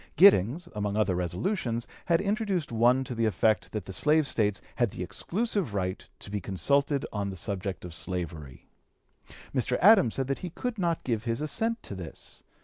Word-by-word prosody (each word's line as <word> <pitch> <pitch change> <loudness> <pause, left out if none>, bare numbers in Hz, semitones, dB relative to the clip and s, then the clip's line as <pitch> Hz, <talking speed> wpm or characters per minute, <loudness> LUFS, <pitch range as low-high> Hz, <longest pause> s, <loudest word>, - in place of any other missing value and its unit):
Giddings, 165 - +5
among 105 -1 -2
other 105 -3 +2
resolutions, 115 - -1 0.2
had 170 -1 +3
introduced 200 - -1
one 120 +3 +4
to 130 - -5
the 115 -1 +1
effect 110 +2 +1
that 105 -4 -4
the 95 - -7
slave 150 +7 +3
States 105 -6 0 0.2
had 120 -3 +2
the 90 - -5
exclusive 190 - -1
right 95 -1 -2
to 100 - -10
be 105 -1 -2
consulted 140 - +1
on 100 -2 -2
the 95 - -6
subject 95 +1 -4
of 90 - -8
slavery. 85 -6 -5 0.9
Mr. 125 -1 +1
Adams 190 - +6
said 135 - -1
that 135 +1 -2
he 180 - -5
could 230 +6 -4
not 170 -3 0
give 115 -3 -1
his 115 -1 -1
assent 225 +10 -1
to - - -7
this. 90 -4 -8
115 Hz, 180 wpm, -28 LUFS, 100-160 Hz, 0.9 s, Adams